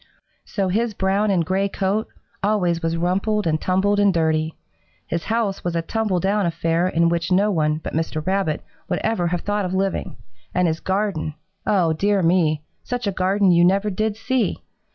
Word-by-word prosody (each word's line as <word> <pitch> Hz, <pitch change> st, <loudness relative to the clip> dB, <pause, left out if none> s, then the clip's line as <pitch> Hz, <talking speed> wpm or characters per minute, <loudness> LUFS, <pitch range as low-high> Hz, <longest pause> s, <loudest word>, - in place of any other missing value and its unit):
So 195 Hz, -3 st, -1 dB
his 220 Hz, +3 st, 0 dB
brown 195 Hz, +2 st, +1 dB
and 180 Hz, -4 st, +2 dB
gray 195 Hz, +3 st, 0 dB
coat 195 Hz, +3 st, -1 dB, 0.3 s
always 185 Hz, -5 st, +1 dB
was 165 Hz, 0 st, -1 dB
rumpled 195 Hz, +5 st, 0 dB
and 155 Hz, -1 st, +1 dB
tumbled 200 Hz, +2 st, +2 dB
and 205 Hz, -1 st, +5 dB
dirty. 160 Hz, -2 st, 0 dB, 0.5 s
His 170 Hz, 0 st, -3 dB
house 220 Hz, -3 st, -1 dB
was 175 Hz, -1 st, -2 dB
a 165 Hz, -, 0 dB
tumble 210 Hz, -1 st, 0 dB
down 195 Hz, +1 st, +1 dB
affair 165 Hz, +1 st, 0 dB
in 170 Hz, -2 st, +2 dB
which 170 Hz, +1 st, -1 dB
no 200 Hz, +3 st, +3 dB
one 155 Hz, -4 st, +1 dB
but 155 Hz, -, -7 dB
Mr. 155 Hz, -1 st, -2 dB
Rabbit 190 Hz, -5 st, 0 dB, 0.3 s
would -, -, 0 dB
ever 220 Hz, -6 st, +1 dB
have 175 Hz, 0 st, -1 dB
thought 205 Hz, 0 st, -1 dB
of 185 Hz, 0 st, -2 dB
living, 195 Hz, -7 st, -1 dB, 0.4 s
and 180 Hz, -1 st, +3 dB
his 160 Hz, 0 st, -1 dB
garden 190 Hz, -6 st, -1 dB, 0.3 s
oh, 175 Hz, -6 st, +3 dB
dear 200 Hz, +3 st, +1 dB
me, 165 Hz, -3 st, +2 dB, 0.2 s
such 245 Hz, -1 st, -3 dB
a 200 Hz, -, +1 dB
garden 190 Hz, +1 st, +2 dB
you 170 Hz, 0 st, +5 dB
never 195 Hz, +3 st, +3 dB
did 215 Hz, +2 st, -1 dB
see! 255 Hz, +2 st, -1 dB
185 Hz, 185 wpm, -22 LUFS, 165-205 Hz, 0.5 s, and